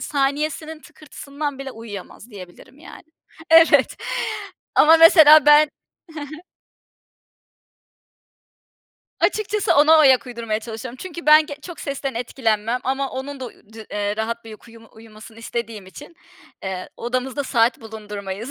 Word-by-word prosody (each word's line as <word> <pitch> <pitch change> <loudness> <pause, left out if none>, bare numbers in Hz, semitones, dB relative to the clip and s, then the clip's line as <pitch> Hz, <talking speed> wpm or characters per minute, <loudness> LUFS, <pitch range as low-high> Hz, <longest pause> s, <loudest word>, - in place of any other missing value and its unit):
saniyesinin 300 +2 -3
tıkırtısından 285 -1 -8
bile 275 0 -7
uyuyamaz 225 -1 -11
diyebilirim, 195 +6 -14
yani. 320 - -13 0.5
Evet, 330 0 +5 0.8
ama 320 +2 +6
mesela 315 -3 +7
ben 295 +1 +6 0.6
He 290 - -13
he 325 - -15 2.8
Açıkçası 425 -1 0
ona 300 +2 +6
ayak 265 -5 +4
uydurmaya 230 -3 -4
çalışıyorum 230 +2 -8
çünkü 340 -3 -9
ben 305 0 +6
ge 285 - -7
çok 345 -2 -10
sesten 275 -1 -5
etkilenmem 230 -1 -2
ama 270 +1 -2
onun 270 +1 -7
da, - - -5
uuu, - - -11 0.2
de 220 -1 -11
eee, 205 0 -3
rahat 230 +1 -4
bir 225 - -11
uykuyu 225 +1 -15
uyumasını 220 0 -15
istediğim 230 -3 -6
için, 290 - -14 0.5
eee, 190 -1 -6
odamızda 255 +4 -3
saat 245 +2 +1
bulundurmayız. 210 0 -8
255 Hz, 125 wpm, -21 LUFS, 220-295 Hz, 2.8 s, mesela